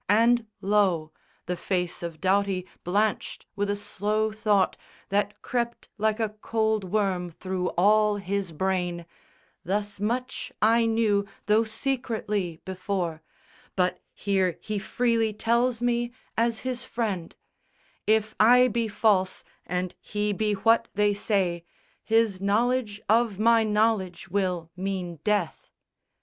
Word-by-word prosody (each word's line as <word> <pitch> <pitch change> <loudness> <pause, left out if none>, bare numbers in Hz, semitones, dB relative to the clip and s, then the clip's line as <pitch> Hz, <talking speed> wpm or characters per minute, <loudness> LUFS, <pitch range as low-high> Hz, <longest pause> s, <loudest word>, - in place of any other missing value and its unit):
And 230 +2 +4
lo, 190 -6 +2 0.3
The 180 - -2
face 180 -1 -2
of 170 -2 -6
Doughty 190 -1 +1 0.2
blanched 205 +4 -1
with 205 0 -1
a 205 - +1
slow 210 +1 -1
thought 210 -3 +2 0.3
That 205 +1 -1
crept 235 -1 -2
like 215 +1 +1
a 220 -2 +1
cold 220 0 -1
worm 185 -2 0
through 185 +2 -3
all 210 +3 +4
his 200 -2 -2
brain, 175 0 -1 0.6
"Thus 205 +2 -2
much 250 +5 -2
I 230 +2 +4
knew, 215 -3 +2 0.2
though 215 +2 +3
secretly, 220 - -2
before; 185 -3 -3 0.5
But 180 -1 +1 0.2
here 190 -3 0
he 215 -1 -3
freely 230 +1 +1
tells 235 +2 +1
me 240 0 +1 0.2
as 230 0 +1
his 255 -1 -3
friend; 205 -10 -3 0.7
If 220 0 +2
I 250 +3 +7
be 230 0 0
false 200 -3 +1 0.2
and 180 0 -2
he 210 0 -1
be 210 +1 0
what 225 +3 +3
they 205 0 +3
say, 190 -5 0 0.4
His 225 -4 +2
knowledge 215 +1 +1
of 225 -2 +3
my 230 +1 +4
knowledge 210 -4 0
will 180 -3 -1
mean 185 -3 -4
death." 205 -6 -1
210 Hz, 125 wpm, -26 LUFS, 190-225 Hz, 0.7 s, I